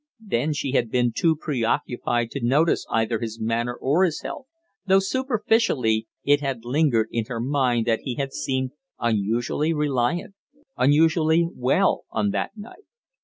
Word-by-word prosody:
Then 150 - 0
she 140 -2 -3
had 120 -4 +1
been 120 0 +1
too 165 -2 +2
preoccupied 120 -4 -1
to 140 - -5
notice 145 +7 +2
either 115 0 0
his 115 -1 -5
manner 115 +2 -1
or 145 +9 +2
his 170 -5 0
health, 265 - -7 0.4
though 190 0 +5
superficially 195 - +1 0.2
it 145 0 +3
had 135 -5 -3
lingered 125 -4 +2
in 115 -2 -1
her 115 0 -5
mind 125 -2 +1
that 115 -2 +1
he 130 -3 -5
had 135 0 -3
seemed 130 -1 -2 0.3
unusually 120 +8 0
reliant, 150 +5 0 0.4
unusually 160 +4 +3
well 130 +10 +1
on 205 - 0
that 200 - -3
night. 225 - -12
135 Hz, 150 wpm, -24 LUFS, 120-160 Hz, 0.4 s, though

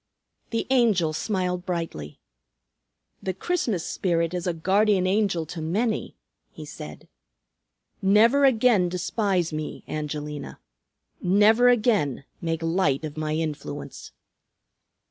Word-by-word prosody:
The 230 - -1
Angel 210 -11 +3
smiled 180 0 -2
brightly. 165 - -5 1.0
"The 190 -1 -3
Christmas 225 - -1
Spirit 170 -2 0
is 180 0 -3
a - - +2
guardian 190 +3 +2
angel 190 -4 +1
to 160 +1 -7
many," 210 +8 -1 0.3
he - - -10
said. - - -10 0.9
"Never 220 +8 +5
again 230 -8 +4
despise 180 -1 -1
me, 155 0 -5
Angelina. 150 -1 -5 0.6
Never 210 +6 +5
again 210 - +2 0.2
make 165 -1 -2
light 165 -4 +1
of 150 -1 -7
my 155 -1 -2
influence." 155 -2 -5
180 Hz, 105 wpm, -25 LUFS, 160-215 Hz, 1.0 s, Never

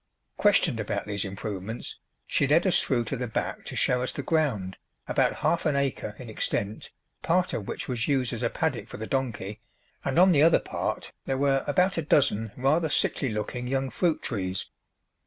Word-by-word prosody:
Questioned - - +3
about - - -2
these 100 -2 -2
improvements, 100 +2 -5 0.3
she 140 - +1
led 160 +6 +4
us 185 - +4
through 120 -3 +1
to 110 - -3
the 125 +1 -3
back 110 - -3
to - - -6
show 125 0 +2
us 125 - -1
the 140 - -5
ground, 125 - 0 0.3
about - - +2
half 170 - +2
an 150 - +1
acre 135 -6 -1
in 125 - -9
extent, 105 -1 -3 0.3
part 180 +2 +1
of 100 - -3
which - - -4
was 120 -3 -1
used 130 -4 +1
as - - -4
a - - +1
paddock - - -1
for - - -8
the 110 - -5
donkey, 110 -6 -3 0.4
and 135 - -1
on 185 +2 +7
the 145 -4 +4
other 165 +1 +7
part - - -3
there 135 - -1
were 135 0 +2
about 180 +4 +2
a - - +1
dozen 130 -8 +2
rather 155 +5 +2
sickly 135 -2 +1
looking 110 +3 -3
young 135 0 -1
fruit 170 -4 0
trees. 95 -5 -3
130 Hz, 195 wpm, -27 LUFS, 110-145 Hz, 0.4 s, on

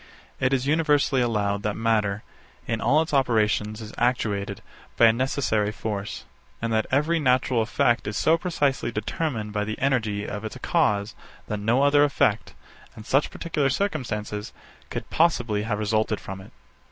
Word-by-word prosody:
64. - - -1
It 135 - 0
is 130 -1 +1
universally 145 -3 +2
allowed 105 -4 0
that 105 0 -2
matter, 110 -2 0 0.4
in 115 0 -2
all 150 +5 +3
its 160 - -8
operations, 110 -4 +1
is 110 0 -9
actuated 105 -5 -1 0.3
by 115 - +6
a 110 - +6
necessary 115 -4 0
force, 105 -2 -5 0.3
and 115 0 -2
that 110 -1 +1
every 150 +5 +2
natural 125 -3 +2
effect 120 +2 +1
is 105 0 -3
so 160 - +4
precisely 160 -8 -1
determined 110 0 -3
by 105 -1 0
the 110 +1 -4
energy 110 -7 0
of 105 +1 -5
its 110 +3 -6
cause 110 - +1 0.3
that 105 - -3
no 120 +6 +2
other 145 0 +5
effect, 140 -6 +1 0.4
in 110 - -9
such 135 +6 +1
particular 150 -5 -1
circumstances, 115 - -3 0.4
could - - -5
possibly 120 -11 +2
have 105 0 -2
resulted 110 0 0
from 95 0 -8
it. - - -14
115 Hz, 165 wpm, -25 LUFS, 105-140 Hz, 0.4 s, by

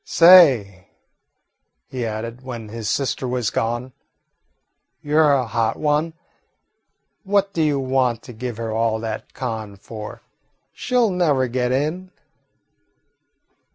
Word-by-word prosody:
Say," 135 - +5 1.0
he 125 -3 -4
added, 115 +3 -6
when 120 -4 -8
his 110 -1 -5
sister 135 -1 -1
was 125 -3 -1
gone, 120 +3 -2 1.1
"you 150 +1 -2
're 155 -2 +5
a 130 -2 +1
hot 115 0 -1
one. 155 +2 0 1.1
What 200 0 +1
do 165 - -1
you 150 -3 +1
want 130 -3 0
to 125 - -11
give 120 0 -6
her 115 -1 -4
all 110 0 0
that 115 -1 -6
con 110 -5 -5
for? 105 +2 -9 0.5
She 250 - -5
'll 230 -4 +3
never 150 -8 +1
get 125 0 -1
in." 155 +8 -2
125 Hz, 125 wpm, -21 LUFS, 115-150 Hz, 1.1 s, Say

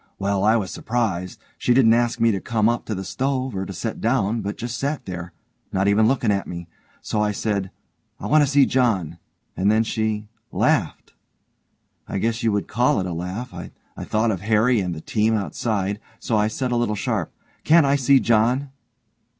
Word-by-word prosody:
Well, 100 0 0
I 110 +2 +4
was 100 -5 -1
surprised; 105 -7 -2 0.2
she 120 - +2
didn't 115 -4 +6
ask 120 0 +1
me 115 0 +4
to 95 -3 -2
come 110 -2 +1
up 120 0 0
to 110 - -3
the 95 - -4
stove, 130 +2 -2
or 95 0 -3
to - - -6
set 110 +5 -5
down, 115 -2 +1
but 100 +1 -4
just 120 0 -5
sat 145 +2 -2
there, 85 -2 -6 0.4
not 95 +1 +1
even 105 +2 +4
looking 120 -4 +1
at 100 -1 -1
me, 85 -1 -7 0.4
so 105 - -1
I 105 0 +1
said, 100 -2 -2 0.5
'I - - -7
want 150 +8 +4
to 140 - +1
see 140 -1 +5
John.' 95 - 0 0.4
And 95 +2 +1
then 110 +1 +3
she 110 -1 -2 0.2
laughed. - - 0 0.9
I - - -3
guess 115 +3 -1
you 115 -2 +2
would 100 -1 -1
call 125 +4 +2
it 95 - -2
a 90 - -3
laugh. 90 +9 -5
I - - -7 0.3
thought 110 +1 +1
of 95 -4 -3
Harry 110 +3 +3
and 90 -3 -2
the 80 - -8
team 110 +4 +1
outside, 100 -1 -2 0.2
so 115 - -2
I 105 0 +3
said 125 +3 -3
a 120 - +1
little 120 -3 0
sharp: - - -2 0.3
'Can't 160 -1 +5
I 140 0 +3
see 135 0 +4
John?' 120 +4 +2
110 Hz, 200 wpm, -22 LUFS, 100-120 Hz, 0.9 s, didn't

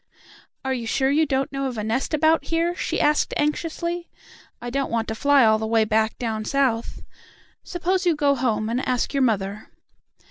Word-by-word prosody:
"Are 265 - 0
you 235 -3 -4
sure 265 +4 +1
you 310 +2 +3
don't 270 -1 -1
know 275 0 -2
of 250 -3 -5
a 210 - -2
nest 225 +5 -1
about 315 +2 +3
here?" 335 +1 0
she - - -2
asked 300 0 +2
anxiously. 340 +3 -2 0.5
"I 240 0 -6
don't 275 +1 -1
want 230 -1 -1
to - - -1
fly 280 +2 +4
all 220 0 +4
the 220 - -2
way 225 -1 +3
back 220 0 +1
down 220 -3 -3
South. 245 -2 -1 0.6
Suppose 360 +1 -1
you 335 - +3
go 285 -1 +2
home 225 -5 -1
and 240 +4 -1
ask 250 +2 0
your 275 - +1
mother." 210 -4 -1
265 Hz, 190 wpm, -23 LUFS, 225-300 Hz, 0.6 s, fly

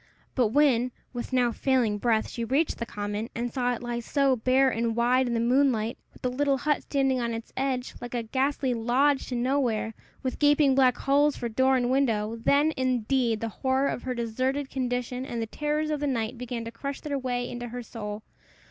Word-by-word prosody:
But 250 -4 +3
when, 250 -1 +3 0.2
with 245 +1 -5
now 250 -2 +3
failing 235 -4 +1
breath, 225 -1 +1
she 235 - -5
reached 275 +7 0
the 235 - -3
common, 205 +2 -4
and 235 +1 -3
saw 245 -1 0
it 240 - -9
lie 240 0 -2
so 275 +2 +2
bare 255 +3 +3
and 230 -2 0
wide 250 +2 +3
in 235 - -1
the - - +1
moonlight, 240 -2 +2 0.2
with - - -20
the 250 - 0
little 275 +1 +1
hut 295 +3 0
standing 270 -2 +1
on 235 -1 -1
its 225 +1 -8
edge, 265 -2 -1
like 245 0 -6
a 235 - -1
ghastly 265 +2 0
lodge 255 +5 +2
to 250 - -3
nowhere, 240 -3 0 0.3
with 260 - -3
gaping 290 -1 +4
black 260 -2 +4
holes 285 +1 +2
for 235 - -3
door 260 +4 +3
and 245 0 0
window, 225 -5 +1
then, 285 +7 +2
indeed, 250 -2 +1
the 230 - -2
horror 265 +1 +2
of - - -3
her 255 -1 -3
deserted 255 +4 -2
condition 250 -1 -2
and 240 -3 -4
the 225 - -1
terrors 300 +5 -2
of 300 - -1
the 290 - -1
night 235 -2 -1
began 240 -1 -5
to 230 - -6
crush 275 +4 -5
their 285 -2 -2
way 245 -1 -2
into 240 0 -5
her 245 +1 -6
soul. 210 -2 -6
250 Hz, 210 wpm, -27 LUFS, 235-270 Hz, 0.3 s, gaping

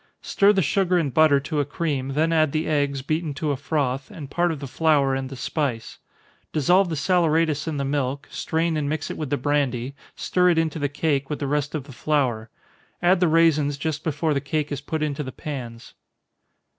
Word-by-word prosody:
Stir 200 +1 +4
the 195 -3 +2
sugar 180 +4 +2
and 145 -7 0
butter 155 -3 +5
to 150 +2 -2
a - - +3
cream, 140 -2 -2
then 160 +3 +1
add 155 -3 +2
the 155 +1 0
eggs, 145 -3 0
beaten 155 0 -2
to 155 0 -1
a - - 0
froth, 135 -2 -2
and 145 -4 -9
part 175 0 +1
of 155 - -5
the 140 - -6
flour 140 -1 +2
and 135 0 -3
the 135 - -7
spice 130 -3 -3 0.5
dissolve 175 +5 +3
the 160 - -2
saleratus 160 -2 +1
in 155 -2 -2
the 140 - -1
milk, 140 0 -2
strain 165 0 -1
and 145 -2 -1
mix 155 0 -3
it - - -5
with 150 -4 -4
the 145 - 0
brandy, 135 -2 -1 0.2
stir 180 0 +2
it 170 - +2
into 160 -1 0
the 145 -1 0
cake, 140 -2 -1
with 150 - -2
the 145 - -3
rest 145 +2 -1
of 150 - -3
the 140 - -13
flour 125 -6 -1 0.5
add 180 +1 +4
the 180 - +3
raisins 155 -3 +3
just 155 +1 -3
before 155 0 0
the 140 - -1
cake 150 +1 -2
is 145 -1 -3
put 155 +2 -3
into 150 -1 -2
the 130 -2 -5
pans. 120 -5 -7
150 Hz, 215 wpm, -24 LUFS, 140-160 Hz, 0.5 s, butter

